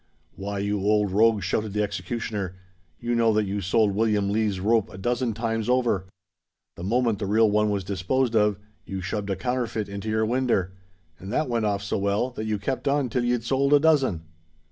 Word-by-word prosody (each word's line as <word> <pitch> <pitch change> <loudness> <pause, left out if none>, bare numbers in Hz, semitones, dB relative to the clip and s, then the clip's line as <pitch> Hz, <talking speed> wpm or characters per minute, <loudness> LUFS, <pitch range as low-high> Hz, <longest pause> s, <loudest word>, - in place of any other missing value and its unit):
"Why, 100 +1 -4
you 100 +1 -1
old 105 0 +2
rogue," 110 0 +3
shouted 105 +2 -1
the 105 0 +1
executioner, 100 -1 -4 0.4
"you 120 0 -2
know 115 -1 +3
that 105 0 +2
you 100 +1 -3
sold 100 +2 +2
William 105 -1 +1
Lees's 105 -3 0
rope 110 +2 +2
a - - -10
dozen 120 +2 -1
times 115 0 -2
over. 120 -7 +1 0.7
The 85 - -8
moment 115 +1 +1
the 100 - -2
real 110 +1 +4
one 105 0 +2
was 100 -2 -1
disposed 105 +7 0
of, 105 -2 +3 0.3
you 95 -1 -5
shoved 100 +2 -3
a 95 - 0
counterfeit 120 -1 -2
into 100 +2 -5
your 110 0 +1
winder; 115 -6 0 0.5
and 95 +2 -8
that 155 - 0
went 115 -2 0
off 100 -1 -1
so 100 - -2
well, 100 +6 0
that 110 -3 -5
you 110 -1 -1
kept 130 +7 -3
on 140 -2 +1
till 125 +2 0
you'd 120 -1 0
sold 135 +3 +2
a - - +6
dozen." 135 - +2
105 Hz, 200 wpm, -25 LUFS, 100-120 Hz, 0.7 s, a